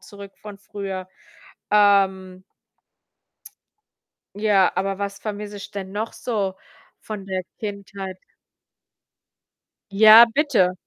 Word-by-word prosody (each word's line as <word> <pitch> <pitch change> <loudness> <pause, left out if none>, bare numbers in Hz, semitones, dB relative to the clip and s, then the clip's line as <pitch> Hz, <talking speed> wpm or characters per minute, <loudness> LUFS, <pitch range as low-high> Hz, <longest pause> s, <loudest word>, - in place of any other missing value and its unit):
zurück 200 -1 -12
von 210 -2 -10
früher. 195 -2 -7 0.6
Ähm 190 -3 +2 1.9
ja, 205 -3 +2
aber 195 +1 -2
was 200 0 -4
vermisse 210 -1 -6
ich 200 - -9
denn 195 -1 -7
noch 215 +3 -4
so 205 -6 -3 0.5
von 210 -3 -8
der 190 -1 -3 0.2
Kindheit? 200 -2 -7 1.7
Ja, 220 +3 +9
bitte. 235 - +2
200 Hz, 95 wpm, -22 LUFS, 190-210 Hz, 1.9 s, Ja